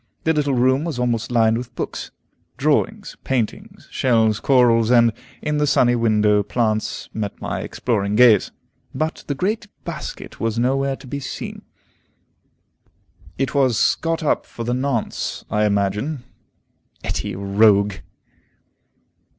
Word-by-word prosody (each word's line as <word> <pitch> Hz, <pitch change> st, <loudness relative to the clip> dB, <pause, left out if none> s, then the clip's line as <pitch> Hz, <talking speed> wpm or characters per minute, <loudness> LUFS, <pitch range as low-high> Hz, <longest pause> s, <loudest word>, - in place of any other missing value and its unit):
The 160 Hz, -, +2 dB
little 145 Hz, -3 st, +1 dB
room 130 Hz, +3 st, +3 dB
was 160 Hz, -6 st, -3 dB
almost 120 Hz, -3 st, -1 dB
lined 115 Hz, -1 st, +3 dB
with 125 Hz, 0 st, -9 dB
books. -, -, -5 dB, 0.5 s
Drawings, -, -, 0 dB
paintings, 125 Hz, -5 st, -3 dB
shells, 110 Hz, -4 st, +2 dB
corals, 120 Hz, -4 st, +4 dB
and, 120 Hz, -2 st, +5 dB, 0.3 s
in 150 Hz, 0 st, 0 dB
the 150 Hz, -, +2 dB
sunny 125 Hz, -3 st, +4 dB
window, 105 Hz, -3 st, +3 dB
plants, 110 Hz, +1 st, -1 dB
met 105 Hz, -2 st, -4 dB
my -, -, -3 dB
exploring 105 Hz, -4 st, -1 dB
gaze, 115 Hz, -4 st, +6 dB, 0.5 s
but 155 Hz, +1 st, -2 dB
the 140 Hz, -, -2 dB
great 210 Hz, +8 st, -1 dB, 0.2 s
basket -, -, -7 dB
was 115 Hz, 0 st, -1 dB
nowhere 135 Hz, +3 st, +1 dB
to 135 Hz, -, -15 dB
be 140 Hz, +2 st, -5 dB
seen. 135 Hz, -, -6 dB, 1.8 s
It 135 Hz, -1 st, -1 dB
was 130 Hz, -5 st, +3 dB
got 165 Hz, 0 st, -2 dB
up 150 Hz, -, 0 dB
for 115 Hz, -, -7 dB
the 120 Hz, +1 st, -1 dB
nonce, 130 Hz, -3 st, -2 dB
I 105 Hz, 0 st, +2 dB
imagine. 105 Hz, +7 st, -1 dB, 0.8 s
Etty 105 Hz, -, -3 dB
a -, -, -6 dB
rogue! 100 Hz, 0 st, +3 dB
120 Hz, 135 wpm, -21 LUFS, 110-135 Hz, 1.8 s, gaze